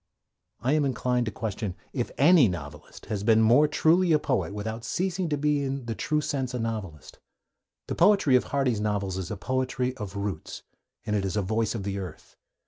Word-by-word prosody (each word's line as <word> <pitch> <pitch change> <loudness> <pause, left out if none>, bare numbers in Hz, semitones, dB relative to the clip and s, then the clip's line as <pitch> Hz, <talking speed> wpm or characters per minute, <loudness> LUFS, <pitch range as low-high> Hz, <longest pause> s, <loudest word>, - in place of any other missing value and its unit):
I 130 +5 +1
am 155 -1 +3
inclined 125 -2 0
to - - -1
question 105 -3 -4 0.2
if 120 -3 -2
any 150 0 +6
novelist 75 -5 -7
has 105 -2 -3
been 110 0 +4
more 125 +7 +5
truly 165 +3 +3
a - - +6
poet 135 -8 -1
without 110 +3 -5
ceasing 180 +6 -1
to 150 - 0
be 150 0 +1
in 135 -2 -3
the 115 - -3
true 150 +7 -1
sense 130 -4 -2
a - - -2
novelist. 105 -9 -5 0.7
The - - -2
poetry 195 -11 +4
of 125 - +3
Hardy's 130 -6 0
novels 100 -3 -1
is 95 -2 -5
a 105 - -4
poetry 130 +3 -1
of 105 -5 -6
roots, 100 -5 -5 0.4
and 105 -2 -1
it 100 - 0
is 95 +2 -2
a 105 - +1
voice 110 +3 0
of 105 - -4
the 100 0 -3
earth. 90 -5 -9
115 Hz, 200 wpm, -27 LUFS, 100-140 Hz, 0.7 s, any